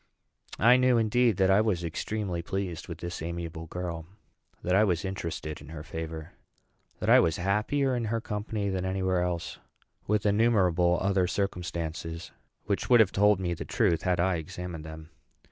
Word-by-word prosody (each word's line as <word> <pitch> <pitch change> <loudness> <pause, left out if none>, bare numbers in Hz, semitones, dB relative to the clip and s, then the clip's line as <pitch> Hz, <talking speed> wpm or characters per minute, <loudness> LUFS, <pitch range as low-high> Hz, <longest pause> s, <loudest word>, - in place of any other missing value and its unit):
I 120 +4 +6
knew, 130 -1 +4
indeed, 115 -1 +2
that 95 0 +4
I 100 +2 +5
was 100 -6 0
extremely 90 +2 -3
pleased 90 -1 -4
with 85 - -6
this 85 0 -6
amiable 85 0 -5
girl; 85 -1 -5 0.6
that 90 - 0
I 100 +3 +5
was 90 -3 0
interested 85 -5 -5
in 70 - -12
her 80 -1 -7
favor; 80 -1 -6 0.7
that - - -3
I - - +8
was 80 - +2
happier 110 +9 +1
in 120 -2 -1
her 115 +1 -1
company 105 -1 -3
than 95 -1 -2
any 95 0 -2
where 95 -1 +1
else; 90 -1 -3 0.5
with 105 0 +1
innumerable 95 -5 +3
other 95 -2 +2
circumstances, 85 -3 -3 0.3
which 100 -1 -2
would 120 -2 +7
have 110 -4 +5
told 105 0 +4
me 90 -2 -1
the - - -5
truth 85 - +1
had 90 -1 0
I 90 0 +2
examined 80 0 -6
them. 80 +1 -10
90 Hz, 175 wpm, -28 LUFS, 85-105 Hz, 0.7 s, I